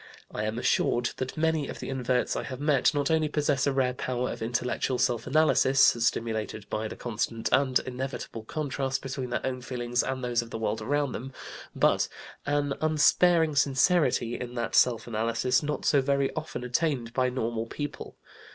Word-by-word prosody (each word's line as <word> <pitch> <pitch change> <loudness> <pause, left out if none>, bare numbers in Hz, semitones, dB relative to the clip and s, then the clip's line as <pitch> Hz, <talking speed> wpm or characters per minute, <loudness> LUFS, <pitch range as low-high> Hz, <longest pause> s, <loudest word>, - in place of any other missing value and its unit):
I 105 - -2
am 110 +1 -2
assured 120 0 +1
that 130 +3 -4
many 160 -2 +1
of - - -7
the - - -6
inverts 125 -1 0
I - - -1
have 130 -2 -6
met 145 -3 +3
not 145 +1 +1
only 160 -1 +2
possess 145 -3 +1
a - - +3
rare 130 -2 +1
power 125 0 -2
of - - -7
intellectual 125 +2 -1
self 120 -2 0
analysis 135 -2 +3 0.2
(stimulated 110 -2 -1
by 110 +1 -1
the - - -7
constant 115 -1 -3
and 130 -1 +4
inevitable 130 -2 -5
contrast 135 +1 -3
between 130 -1 -4
their 120 - -2
own 130 -1 -3
feelings 120 -1 -1
and 130 -1 -3
those 120 -1 +1
of 115 - -10
the - - -5
world 110 0 -2
around 145 +4 0
them), 135 +2 -6 0.4
but - - +3 0.4
an 145 -1 +1
unsparing 155 +1 +4
sincerity 135 -3 +2
in 125 -1 -6
that 115 -2 -3
self 115 -3 +3
analysis 115 +2 0
not 150 -2 -3
so 140 - +4
very 140 0 +1
often 155 -5 -5
attained 125 -2 -1
by 130 0 +2
normal 115 -2 -2
people. 145 +4 -6
130 Hz, 180 wpm, -28 LUFS, 120-145 Hz, 0.4 s, and